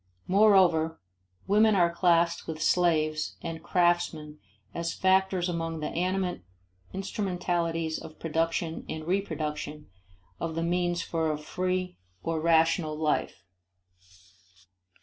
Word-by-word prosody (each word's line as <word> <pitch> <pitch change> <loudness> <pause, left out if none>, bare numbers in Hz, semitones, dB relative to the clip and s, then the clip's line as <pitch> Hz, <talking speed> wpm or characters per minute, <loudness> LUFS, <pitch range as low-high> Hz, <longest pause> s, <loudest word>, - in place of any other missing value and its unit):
Moreover, 185 -5 +4 0.5
women 215 +1 +4
are 170 -2 +3
classed 170 -1 +2
with 160 -1 -5
slaves 155 -2 +1
and 165 -1 -5
craftsmen 170 -4 0 0.3
as 170 0 -3
factors 190 -1 +2
among 165 -2 -3
the 150 - -3
animate 180 - -1 0.5
instrumentalities 175 -4 -2
of 155 - -11
production 165 0 -1
and 155 0 -5
reproduction 155 - -3 0.5
of 165 -1 -3
the 165 - -1
means 175 0 0
for 160 -2 -1
a 150 - -2
free 180 +3 -3 0.2
or 165 -1 -1
rational 165 -1 +2
life. 155 -1 -1
170 Hz, 110 wpm, -28 LUFS, 160-180 Hz, 0.5 s, Moreover